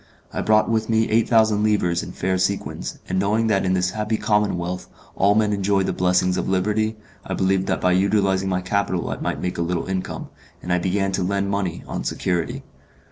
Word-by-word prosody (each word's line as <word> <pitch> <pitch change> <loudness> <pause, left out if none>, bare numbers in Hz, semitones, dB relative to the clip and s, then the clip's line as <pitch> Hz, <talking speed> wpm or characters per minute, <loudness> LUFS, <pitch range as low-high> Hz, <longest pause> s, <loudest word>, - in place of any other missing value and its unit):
I - - -2
brought 110 0 +3
with 110 -1 0
me 110 0 +2
eight 115 +1 +3
thousand 110 -3 +4
livres 100 -5 +1
in - - -7
fair 95 0 -1
sequins, 95 +2 -2
and 95 - 0
knowing 105 +4 +1
that 100 -3 +2
in 95 - +2
this 90 0 +1
happy 110 +1 -1
commonwealth 90 -5 -1 0.3
all 100 +2 +3
men 105 -1 +2
enjoyed 100 -1 +1
the - - -1
blessings 90 0 +2
of 90 - -2
liberty, 105 +4 +1 0.3
I - - -4
believed 95 0 +1
that - - 0
by 90 - +3
utilizing 95 0 +2
my 90 -1 0
capital 95 -1 -1
I - - -3
might - - -3
make 90 -1 -3
a - - +1
little 85 0 -1
income, 95 -1 -4 0.3
and 90 - -1
I 90 - +2
began 95 +2 0
to 95 - -1
lend 100 +1 0
money, 95 -4 -2
on - - -4
security. 85 -4 -2
95 Hz, 205 wpm, -22 LUFS, 90-105 Hz, 0.3 s, thousand